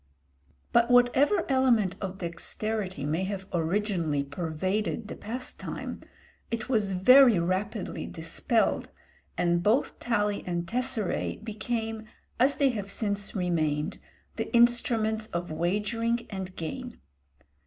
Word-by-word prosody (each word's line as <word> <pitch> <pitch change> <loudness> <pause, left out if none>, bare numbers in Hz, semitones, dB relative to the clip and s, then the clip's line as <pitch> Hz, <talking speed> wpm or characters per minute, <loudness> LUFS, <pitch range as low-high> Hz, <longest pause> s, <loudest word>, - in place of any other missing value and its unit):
But 235 0 +4
whatever 260 +9 +4
element 245 -8 +3
of 190 -1 -4
dexterity 185 0 -3
may 160 +5 0
have 195 -1 -4
originally 170 -4 0
pervaded 185 +9 -2
the - - -5
pastime, 245 +4 -6 0.5
it 230 0 -3
was 215 -6 +1
very 245 +4 +7
rapidly 185 +4 -2
dispelled, 165 +8 0 0.5
and 175 -1 +2
both 215 +8 +1
tali 210 -4 0
and 175 -1 -1
tesseræ 240 -4 -1
became, 220 0 -3 0.3
as 270 +3 +4
they 280 -2 +3
have 205 -5 -4
since 205 -1 -1
remained, 165 -3 0 0.4
the - - -3
instruments 230 -2 +3
of 175 -4 -4
wagering 210 +8 0
and 190 -2 -5
gain. 160 - -6
205 Hz, 110 wpm, -28 LUFS, 175-235 Hz, 0.5 s, very